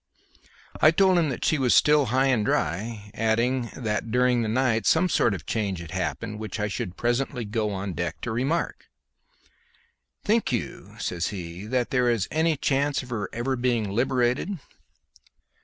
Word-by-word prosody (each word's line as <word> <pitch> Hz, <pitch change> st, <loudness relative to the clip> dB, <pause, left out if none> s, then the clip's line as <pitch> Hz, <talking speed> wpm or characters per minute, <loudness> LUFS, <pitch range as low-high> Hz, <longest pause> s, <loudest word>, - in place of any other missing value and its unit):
I 155 Hz, -, +8 dB
told 185 Hz, +2 st, +4 dB
him 160 Hz, -3 st, +1 dB
that 130 Hz, -, -3 dB
she 155 Hz, -, +2 dB
was 125 Hz, -2 st, +3 dB
still 150 Hz, -3 st, +5 dB
high 130 Hz, +4 st, +2 dB
and 125 Hz, -5 st, +2 dB
dry, 105 Hz, +4 st, -2 dB
adding 115 Hz, +2 st, 0 dB
that 110 Hz, -2 st, -2 dB
during 125 Hz, +1 st, +2 dB
the 110 Hz, -, -1 dB
night 115 Hz, -1 st, +1 dB
some 180 Hz, +3 st, +4 dB
sort 120 Hz, -, +2 dB
of 80 Hz, -6 st, -9 dB
change 100 Hz, -4 st, -2 dB
had 85 Hz, -1 st, -9 dB
happened 95 Hz, +3 st, -3 dB
which 110 Hz, 0 st, -5 dB
I 105 Hz, -, 0 dB
should 95 Hz, -2 st, -5 dB
presently 120 Hz, 0 st, -1 dB
go 105 Hz, +1 st, -1 dB
on 95 Hz, -1 st, -4 dB
deck 85 Hz, -1 st, -3 dB
to 120 Hz, -, -3 dB
remark. 135 Hz, +9 st, -1 dB, 1.4 s
"Think 220 Hz, -4 st, +1 dB
you," 120 Hz, -, -4 dB
says 90 Hz, -1 st, -2 dB
he, 90 Hz, 0 st, -6 dB
"that 125 Hz, +1 st, -1 dB
there 125 Hz, -2 st, +2 dB
is 115 Hz, -5 st, +1 dB
any 160 Hz, 0 st, +1 dB
chance 140 Hz, +1 st, 0 dB
of 125 Hz, -, -12 dB
her 105 Hz, -4 st, -3 dB
ever 125 Hz, +3 st, -1 dB
being 120 Hz, -5 st, 0 dB
liberated?" 125 Hz, -, 0 dB
120 Hz, 170 wpm, -25 LUFS, 105-130 Hz, 1.4 s, I